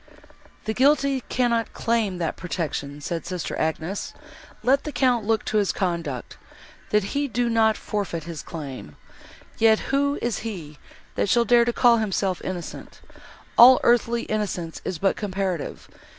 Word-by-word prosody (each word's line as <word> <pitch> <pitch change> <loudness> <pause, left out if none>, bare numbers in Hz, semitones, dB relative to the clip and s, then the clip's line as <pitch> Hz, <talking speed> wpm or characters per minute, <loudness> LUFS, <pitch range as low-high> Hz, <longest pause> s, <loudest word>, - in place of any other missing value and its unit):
"The 220 - -1
guilty 275 +1 +3
cannot 235 -2 0
claim 225 -5 0
that 165 -2 -2
protection!" 150 -5 -4
said 165 +1 -3
sister 180 -2 -4
Agnes, 160 +5 -2 0.5
"let 270 +3 +3
the 300 - -4
Count 245 -6 +1
look 225 -1 +1
to 215 - 0
his 205 -2 +2
conduct, 170 -9 -3 0.5
that 210 -1 +2
he 285 0 0
do 240 0 0
not 220 -1 +3
forfeit 195 -6 -3
his 165 -2 -6
claim! 135 - -8 0.6
Yet 220 +1 +3
who 280 +1 +2
is 240 -2 -2
he, 170 -10 -7 0.3
that - - 0
shall 235 +3 +4
dare 235 +1 +5
to 240 - +1
call 240 -1 +5
himself 195 -4 -1
innocent!—all 230 +6 +2
earthly 235 0 +3
innocence 195 -6 -3
is 185 - -3
but 195 +4 +1
comparative. 190 -5 -3
210 Hz, 145 wpm, -24 LUFS, 170-235 Hz, 0.6 s, dare